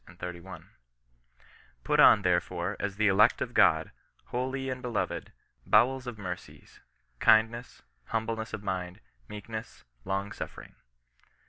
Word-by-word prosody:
*^ 85 0 -9 1.2
Put - - +1
on, 105 - +7
therefore, 90 +1 0
as 100 -2 -3
the 110 +1 +2
elect 100 +2 +5
of - - -3
God, - - +4 0.3
holy 130 +2 -3
and 130 0 -5
be 125 - -4
loved, 115 - -3 0.3
bowels 125 +4 +3
of 120 -3 -6
mercies, 90 -3 -8 0.4
kindness, 115 - +2 0.2
humbleness 110 - -3
of 105 -2 -6
mind, 90 -1 -4 0.3
meekness, 110 +1 -8 0.2
long 100 +1 -2
suffering." - - -8
105 Hz, 120 wpm, -29 LUFS, 95-115 Hz, 1.2 s, on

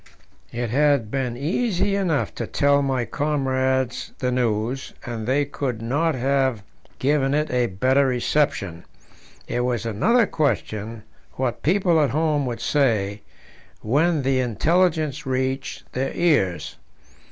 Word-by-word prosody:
It 120 -1 -3
had 140 -5 +2
been 125 -3 -2
easy 195 - 0
enough 160 - 0
to - - -4
tell 140 0 +3
my 130 -3 0
comrades 130 -3 -1
the 125 -1 -1
news, 120 +1 -1
and 115 -2 -5
they 140 +3 +2
could 135 -4 -3
not 145 +8 0
have 130 -3 0 0.3
given 140 0 +1
it 150 +1 0
a 125 -1 +2
better 130 +8 +2
reception; 125 - 0 0.6
it - - -2
was 125 -2 -1
another 220 - +3
question 115 - -2 0.3
what 125 -2 -2
people 175 -1 +3
at 145 - +2
home 150 -2 +1
would 120 -1 -4
say 110 -8 +1 0.6
when 150 +6 +1
the 130 0 +2
intelligence 155 - +1
reached 130 +1 -2
their 135 +1 -1
ears. 145 - +1
130 Hz, 130 wpm, -23 LUFS, 120-150 Hz, 0.6 s, tell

